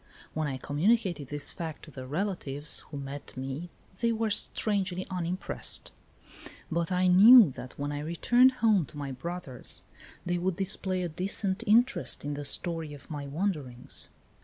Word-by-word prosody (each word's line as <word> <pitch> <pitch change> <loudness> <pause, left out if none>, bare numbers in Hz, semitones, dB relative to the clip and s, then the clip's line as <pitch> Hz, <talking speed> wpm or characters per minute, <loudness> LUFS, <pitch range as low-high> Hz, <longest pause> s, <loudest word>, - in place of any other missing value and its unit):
When 155 -1 -1
I 135 -2 -3
communicated 170 - +1
this 145 +1 -2
fact 165 -4 -6
to 155 - -13
the 130 -2 -8
relatives 150 -3 -2
who 145 - -6
met 140 -1 -7
me 135 +6 -5 0.3
they 235 -1 +2
were 225 -1 0
strangely 190 -3 +1
unimpressed; 180 +1 -1 0.8
but 170 +2 -1
I 180 0 +2
knew 200 - +9
that 125 0 -9
when 145 +1 -3
I 145 - -3
returned 240 - +4
home 200 -9 +4
to 150 - -13
my 140 -2 -4
brothers 145 -1 -5 0.4
they 175 0 0
would 180 0 0
display 190 -1 0
a - - -1
decent 190 +5 -2
interest 235 - +3
in 145 - -2
the 145 0 -5
story 165 -1 -2
of 145 - -14
my 145 -2 -5
wanderings. 140 -6 -4
170 Hz, 160 wpm, -29 LUFS, 145-190 Hz, 0.8 s, knew